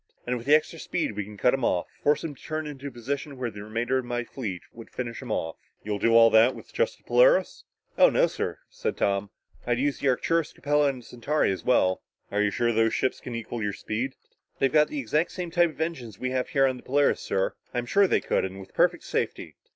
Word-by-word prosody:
"And 125 - -1
with 120 +1 -7
the 150 - +7
extra 160 +2 -1
speed, 175 -5 -2
we 105 -1 -3
can 105 0 -11
cut 125 - +3
him 135 -2 -1
off, 90 -6 +1 0.2
force 145 0 +2
him 160 - -4
to 135 - -19
turn 155 0 -4
into 140 -2 -7
a - - -6
position 135 +4 -4
where 125 -2 -3
the 105 0 -9
remainder 115 +4 -1
of 130 - -5
my 120 0 -2
fleet 105 -8 -6
would 115 -1 -11
finish 120 -2 -5
him - - -6
off." 80 0 -2 0.3
"You'll 105 -1 -2
do 115 +1 +6
this 110 +4 +6
with - - -13
just 485 +1 0
the - - -31
Polaris?" - - +3 0.3
"Oh, - - +8
no, - - +4
sir," - - -3
said - - -4
Tom. 100 0 0 0.4
"I'd 120 -1 +2
use 140 +2 0
the - - 0
Arcturus, 165 +5 +1
Capella 145 0 +2
and 130 -3 -5
the - - -19
Centauri, 135 +2 0
as 95 - -4
well." 95 -7 +2 0.3
"Are 105 - +1
you 105 - +3
sure 120 +3 +1
those 115 - 0
other 115 - +4
ships 130 - -1
can 125 - -7
equal 115 0 -5
your 105 -1 -1
speed?" 125 +8 -3 0.4
"They've 135 - +1
got 150 -1 +5
exactly 150 +3 0
the - - -15
same 175 -2 -4
type 170 -3 +2
engines 155 - -3
as - - -26
we 125 0 -2
have 130 -1 -1
here 135 -1 +3
on 130 -1 0
the - - -13
Polaris, 145 +2 +2
sir. 95 - -1 0.2
I'm 120 -1 -2
sure 200 +10 +4
they - - +2
could - - 0
and 95 +1 -5
with 95 - -12
perfect - - +2
safety." - - -3
125 Hz, 250 wpm, -26 LUFS, 115-150 Hz, 0.4 s, Oh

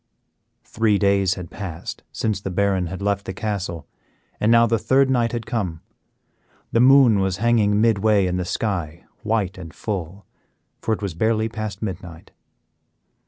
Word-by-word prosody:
Three 110 -2 +1
days 100 -2 +2
had 90 -3 -8
passed 90 -6 -7
since 105 -3 -2
the 95 - -4
Baron 95 -1 0
had 95 +3 -6
left 100 -1 0
the 95 - -5
castle, 95 -7 -4 0.5
and 110 - +2
now 115 0 +6
the 115 -1 +1
third 135 +4 +3
night 120 -2 +1
had 115 -2 -4
come. 100 -9 -3 0.9
The 115 - +2
moon 125 -4 +6
was 95 -1 0
hanging 105 -2 +2
midway 110 -2 +3
in 90 0 -1
the 90 - -1
sky, 85 -5 -3 0.2
white 105 -4 -1
and 80 -3 -8
full, 95 +1 -5 0.6
for - - -2
it 105 - -10
was 100 -4 -3
barely 110 +5 +1
past 110 -2 -5
midnight. 90 -5 -7
100 Hz, 160 wpm, -22 LUFS, 95-110 Hz, 0.9 s, now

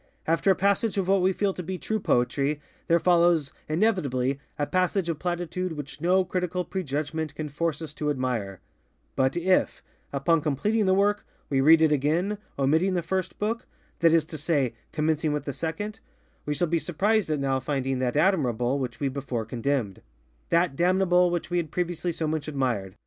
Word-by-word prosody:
After 165 +4 +2
a 190 - +6
passage 200 +3 +1
of 190 -2 0
what 195 0 +3
we 185 +1 +3
feel 195 +1 0
to 180 - -5
be 185 +2 -4
true 220 +4 -2
poetry, 140 0 +1 0.3
there 170 - +5
follows, 170 -4 +3 0.2
inevitably, 145 - +1 0.2
a 145 - 0
passage 185 +1 0
of 160 -3 -2
platitude 175 0 -2
which 145 0 -8
no 185 +2 +3
critical 180 0 -2
prejudgment 155 -3 -3
can 150 0 -4
force 160 +2 -2
us 150 -2 -7
to 150 -1 -2
admire; 125 -9 -2 0.5
but 130 +4 +1
if, 185 +2 +1 0.3
upon 150 +4 +2
completing 195 +9 +1
the 190 - +4
work, 205 +1 +2 0.3
we 135 -1 +3
read 160 +3 +6
it 155 - +4
again, 165 +9 +1 0.2
omitting 160 +8 +2
the 175 - 0
first 185 +2 -2
bookŌĆöthat 225 +3 -1 0.5
is 165 -1 +3
to 155 - -8
say, 145 -6 +1 0.2
commencing 155 0 0
with 150 - -2
the 140 - -2
secondŌĆöwe 170 - -4 0.5
shall 150 +5 +1
be 165 +1 +1
surprised 200 +4 +1
at 155 - +1
now 135 -1 0
finding 135 -1 -2
that 130 +2 0
admirable 140 - +2
which 125 -3 -4
we 140 - 0
before 130 -4 -3
condemnedŌĆöthat 115 - -2
damnable 180 +1 +3
which 175 0 -3
we 175 - +1
had 165 -3 -1
previously 175 +1 -2
so 160 -1 -2
much 155 -1 -2
admired. 125 -10 -2
160 Hz, 175 wpm, -26 LUFS, 140-180 Hz, 0.5 s, a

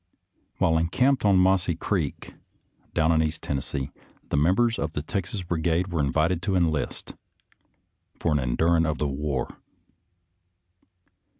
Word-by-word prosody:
• - - -48
♦ - - -49 0.5
♦ - - -38
While 80 0 +3
encamped 125 +11 +2
on 100 -2 +5
Mossy 90 -2 +3
Creek, 85 -3 -3 0.6
down 80 +1 +3
in 80 -1 +3
East 80 0 -2
Tennessee, 70 0 -3 0.4
the - - -1
members 95 +11 +2
of 75 +2 -2
the 75 - -3
Texas 95 +3 -3
Brigade 85 +1 0
were 85 -4 0
invited 80 +5 +1
to 95 +2 -1
enlist 80 -5 -1 0.5
" - - -43
for 85 - 0
an' 75 - +2
indurin' 80 +6 +2
of 80 - -1
the 75 - 0
war." 70 -1 -3
80 Hz, 155 wpm, -26 LUFS, 75-90 Hz, 0.6 s, on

